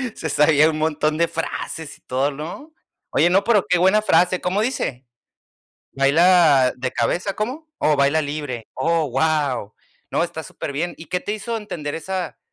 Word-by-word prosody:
se 160 - -4
sabía 150 +1 +4
un 155 - -2
montón 155 0 0
de 170 +1 +2
frases 165 -2 -5
y - - -32
todo, 135 +3 -1
¿no? 165 - -8 0.4
Oye, 175 - +3
no, 195 +2 +3
pero 215 -5 +3
qué 180 -3 +3
buena 190 +4 +4
frase, 180 -2 +2
¿cómo 190 +3 0
dice? 145 - -2 0.9
Baila 145 -1 +4
de 130 0 -3
cabeza, 180 - -1
¿cómo 260 +9 -4
Oh, 150 - +2
"baila 140 +3 +3
libre". 145 -6 -5
Oh, 165 +3 0
guau. 135 -6 0 0.4
No, - - +1
está - - -5
superbién. 160 +5 -4
¿Y 165 - -10
qué 180 - -1
te 205 - -4
hizo 225 +2 -4
entender 155 -9 -5
esa 180 +1 -4
160 Hz, 170 wpm, -21 LUFS, 145-185 Hz, 0.9 s, sabía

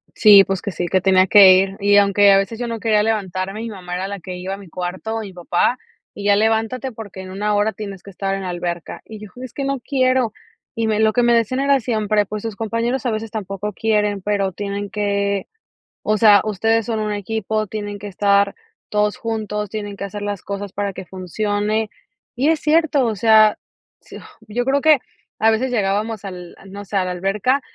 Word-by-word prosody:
Sí, 205 -3 +8
pues, 195 -1 -3
que 200 - -4
sí, 175 0 -3
que 185 +1 +1
tenía 190 -1 +4
que 195 -2 +8
ir, 195 +1 +1
y 205 0 +4
aunque 200 0 +5
a 195 - +6
veces 200 +3 -1
yo 240 0 -3
no 230 -1 -4
quería 210 -2 +2
levantarme, 195 -2 -2
mi 230 - -5
mamá 180 -4 -8
era 190 +1 -3
la 200 -1 -6
que 180 +1 -7
iba 185 +2 -5
a - - -12
mi 200 -2 -13
cuarto, 185 +6 -4
o - - -2
mi 195 -3 -8
papá, 180 +7 0 0.4
y 205 - -8
ya 205 -1 +5
levántate, 225 +4 0
porque, 205 -4 -9
en 185 - -9
una 210 +2 -1
hora 205 +1 +1
tienes 195 -2 -7
que 200 - -13
estar 195 0 -3
en 195 - -3
la 185 - -4
alberca. 175 -1 -5
Y 220 -1 -10
yo, 215 - -9 0.2
es 255 - -9
que 275 - -4
no 275 -1 -1
quiero. 255 -3 +1 0.4
Y 225 -1 -1
lo 215 - +1
que - - 0
me - - -1
lo 220 -1 +3
que 245 - +2
me 240 0 +4
decían 235 +3 +1
era 280 0 +3
siempre, 215 -3 0
pues, 210 +1 -5
sus 225 -3 -4
compañeros 230 +4 -2
a 240 - +1
veces 215 0 -4
tampoco 205 -1 -5
quieren, 210 -2 0
pero 200 -1 0
tienen 200 +1 -4
que, 200 -1 -1 0.5
o 215 0 +1
sea, 205 -2 +6
ustedes 225 +2 +1
son 225 -2 -1
un 215 0 -2
equipo, 215 +1 -2
tienen 205 0 -5
que 205 - -7
estar 200 0 +2 0.3
todos 210 0 0
juntos, 210 -2 -3
tienen 205 -2 -6
que - - -6
hacer 205 +1 -7
las 205 -1 -4
cosas 200 -1 -6
para 200 -1 -3
que 185 - -8
funcione, 205 +4 -2 0.5
y 275 +5 +2
es 320 -2 +2
cierto, 305 -4 +2
o 220 -2 -1
sea, 215 +1 +5 0.4
s - - -12 0.3
yo 240 +4 -2
creo 275 +1 +1
que 310 -3 +5 0.4
a 225 +1 +4
veces 250 +3 0
llegábamos, 210 0 -1
al, 180 -2 -8
no 200 +1 -9
sé, 200 - -7
a 185 - +1
la 180 - -3
alberca 200 +9 0
210 Hz, 225 wpm, -20 LUFS, 195-225 Hz, 0.5 s, Sí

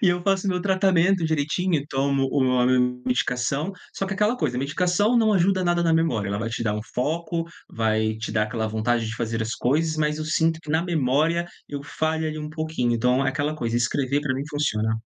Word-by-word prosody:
E 190 - +5
eu 175 0 +1
faço 195 +1 +1
o - - +2
meu 180 -1 -1
tratamento 190 -2 +3
direitinho, 160 +1 0
tomo 135 0 +1
o 130 -3 +2
a 125 - +3
medicação, 125 +4 0 0.2
só 195 - -2
que 195 - -3
é - - -2
aquela 210 +5 +1
coisa: 130 - -1
medicação 180 - +1
não 220 -2 +4
ajuda 185 -1 +2
nada 175 0 +2
na 165 -1 +2
memória, 125 -12 +1
ela 100 +1 -2
vai 115 +1 -2
te 120 0 -3
dar 105 -2 0
um 105 - -3
foco, 165 +5 -1 0.2
vai 110 -1 0
te 110 -1 -5
dar 110 -1 +2
aquela 110 +1 -2
vontade 110 +1 0
de 110 - -4
fazer 115 -1 -2
as 110 +1 -3
coisas, 155 +5 0
mas 150 0 0
eu 155 - -3
sinto 160 +1 +1
que, 150 - -8
na 160 +2 +2
memória, 165 +1 +1 0.2
eu 140 -1 -5
falho 160 +2 -1
ali 155 0 -4
um 150 - -5
pouquinho. 155 -6 -1
Então, 125 +3 +2
é - - +3
aquela 150 +2 -1
coisa: 120 -4 -1
escrever, 130 +3 0
para 130 -3 -1
mim, 135 - -3
funciona. 110 -7 0
145 Hz, 225 wpm, -24 LUFS, 125-170 Hz, 0.2 s, E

